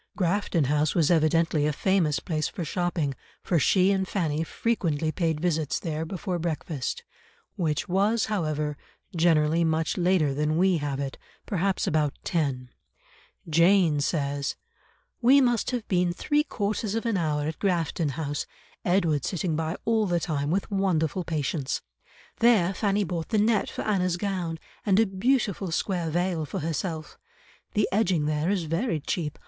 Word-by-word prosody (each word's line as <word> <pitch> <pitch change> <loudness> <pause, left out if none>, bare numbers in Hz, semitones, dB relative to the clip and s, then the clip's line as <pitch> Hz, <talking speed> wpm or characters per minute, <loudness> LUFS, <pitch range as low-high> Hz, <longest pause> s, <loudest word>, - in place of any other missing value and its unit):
Grafton 185 -3 +1
House 150 +2 +1
was 165 -2 +3
evidently 160 -2 +3
a - - +1
famous 165 -1 +1
place 155 -3 -2
for 175 - -5
shopping, 170 -3 -1 0.3
for 175 - +2
she 185 +6 +4
and 190 -1 0
Fanny 160 -6 -1
frequently 165 -6 -1
paid 160 -2 -1
visits 160 -3 0
there 160 -2 -3
before 180 +1 -3
breakfast, 160 -4 -3 0.5
which 155 -5 -1
was, 205 +5 +2
however, 155 -7 -1 0.4
generally 165 -1 +3
much 160 0 0
later 175 -5 +2
than 150 +2 0
we 185 0 +3
have 145 -2 -3
it, 140 -1 -4 0.3
perhaps 195 -1 0
about 150 -2 +1
ten; 135 -7 -1 0.8
Jane 170 -1 +4
says, 140 -2 -1 0.7
"We 260 +4 +6
must 240 -4 +2
have 245 -4 -3
been 180 -2 +1
three 295 - +1
quarters 210 -3 -2
of 225 - -2
an 230 -3 +1
hour 150 -4 0
at 160 - -5
Grafton 170 -4 0
House, 145 0 -3 0.4
Edward 170 -6 +2
sitting 175 -3 -1
by 160 +3 -2
all 220 -2 +2
the 175 -1 +1
time 145 -3 -2
with 190 +5 -1
wonderful 185 -3 0
patience. 150 -3 -2 0.6
There 215 -6 +4
Fanny 205 +1 +1
bought 170 -2 -4
the 220 - +1
net 215 0 +2
for - - -5
Anna's 185 -4 +1
gown, 180 -4 -2 0.3
and 200 -1 +3
a 225 - +5
beautiful 200 -1 0
square 170 0 -1
veil 175 0 0
for 190 - -4
herself. 160 0 -4 0.6
The 210 0 +3
edging 185 -7 +2
there 150 +2 0
is 195 -3 +1
very 165 +4 -1
cheap. 150 +1 -3
170 Hz, 155 wpm, -26 LUFS, 155-195 Hz, 0.8 s, We